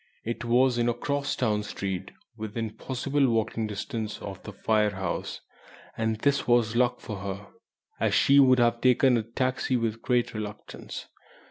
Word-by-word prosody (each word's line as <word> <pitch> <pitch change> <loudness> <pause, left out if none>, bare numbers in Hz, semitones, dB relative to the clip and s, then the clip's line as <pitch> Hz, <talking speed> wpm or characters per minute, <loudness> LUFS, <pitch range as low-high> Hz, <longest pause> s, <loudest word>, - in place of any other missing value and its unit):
It 115 +1 -4
was 120 +1 +3
in 120 0 +2
a 120 - 0
cross 140 +3 -1
town 105 -4 +1
street, 95 -2 -4 0.3
within 110 0 -4
possible 135 +5 0
walking 110 -1 0
distance 105 +1 -4
of 95 -2 -7
the - - -8
Phayre 105 0 +1
house; 95 0 -3 0.5
and 110 -1 0
this 140 -1 +2
was 120 -2 +3
luck 125 0 +2
for 105 -2 -6
her, 100 +1 -5 0.5
as - - +2
she 140 +1 +6
would 130 -2 +6
have 120 -1 +2
taken 130 0 +5
a 115 - +2
taxi 130 +3 -1
with 115 -1 -2
great 125 -2 +1
reluctance. 105 -1 -7
115 Hz, 160 wpm, -27 LUFS, 105-125 Hz, 0.5 s, she